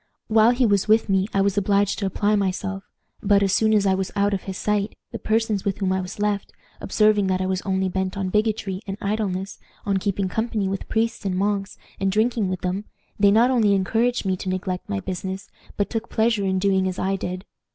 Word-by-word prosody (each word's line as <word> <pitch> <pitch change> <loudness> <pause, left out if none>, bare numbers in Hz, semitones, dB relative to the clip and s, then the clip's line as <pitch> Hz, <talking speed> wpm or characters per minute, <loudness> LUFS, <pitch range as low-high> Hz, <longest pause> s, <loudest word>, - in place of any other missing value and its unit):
While 220 +1 +5
he 250 +1 +3
was 200 -2 +2
with 220 0 +3
me 190 0 +2
I 195 - +1
was 200 +1 +2
obliged 200 0 +1
to 200 - 0
apply 205 +2 +1
myself, 195 0 -2 0.4
but, 200 -1 +3
as 195 -1 +1
soon 220 +1 +3
as 210 -2 +3
I 190 - +3
was 190 0 -2
out 200 0 +2
of 190 - -3
his 190 -1 -5
sight, 210 0 -1 0.2
the - - -5
persons 220 -2 0
with 195 -2 -1
whom 190 -2 0
I 190 - 0
was 180 - -7
left, 205 -1 -1 0.3
observing 210 -2 +2
that 185 -1 +1
I 185 - -1
was 185 0 -1
only 190 -1 0
bent 190 +1 -2
on 190 -1 -1
bigotry 210 -2 0
and 195 0 -4
idleness, 200 -2 -2 0.3
on 200 -1 +1
keeping 195 0 -1
company 220 0 -1
with 195 0 -4
priests 225 0 0
and 190 -2 -1
monks, 200 0 -1 0.2
and 195 0 +1
drinking 220 -1 +1
with 185 -1 -3
them, 185 +3 -2 0.3
they 200 0 +6
not 230 +5 +4
only 215 -5 +3
encouraged 225 +5 +1
me 190 -1 +1
to 185 - -5
neglect 185 0 -3
my 100 -1 -2
business, 190 +1 -5 0.3
but 205 - +1
took 225 0 -3
pleasure 220 -2 +1
in 190 0 +1
doing 190 0 +2
as 185 0 -3
I 195 +1 0
did. 185 0 -5
200 Hz, 225 wpm, -23 LUFS, 190-210 Hz, 0.4 s, they